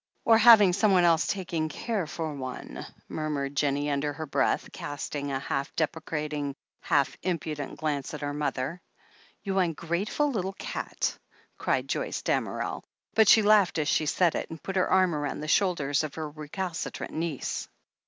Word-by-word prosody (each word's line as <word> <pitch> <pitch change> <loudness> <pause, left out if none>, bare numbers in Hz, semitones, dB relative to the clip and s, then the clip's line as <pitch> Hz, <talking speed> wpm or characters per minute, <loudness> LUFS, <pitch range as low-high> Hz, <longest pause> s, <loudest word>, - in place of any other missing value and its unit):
"Or 225 -1 +6
having 215 -5 +8
someone 195 -2 +4
else 165 -2 +4
taking 170 -5 -2
care 200 +2 -2
for 160 -1 -4
one," 130 -2 -6 0.2
mur 155 0 -3
mured 140 -1 -2
Jennie 145 0 +1
under 145 +1 -1
her 160 +2 -5
breath, 140 - +1
casting 145 -1 -4
a 135 - 0
half 135 +1 -3
depre 160 0 -1
cating, 150 -3 -3 0.3
half 140 -2 +2
impudent 155 -5 -3
glance 145 -4 -2
at 150 - -7
her 145 0 -2
mother. 150 +2 -2 0.6
"You 195 -2 0
ungrateful 175 - 0
little 195 -5 -2
cat!" - - -3 0.4
cried - - 0
Joyce - - -2
Damerel. - - -1 0.3
But 220 -1 +5
she 220 - +8
laughed 205 -4 +5
as 150 -2 0
she 155 - +2
said 175 +2 +3
it, - - -3
and 165 - -9
put 195 - -4
her 185 - +2
arm 185 -2 +4
round 145 -1 -3
the - - -4
shoulders 155 -6 +2
of 150 -2 -5
her 160 -1 -3
recalcitrant 155 +4 -5
niece. 160 -4 -3
155 Hz, 165 wpm, -28 LUFS, 145-185 Hz, 0.6 s, having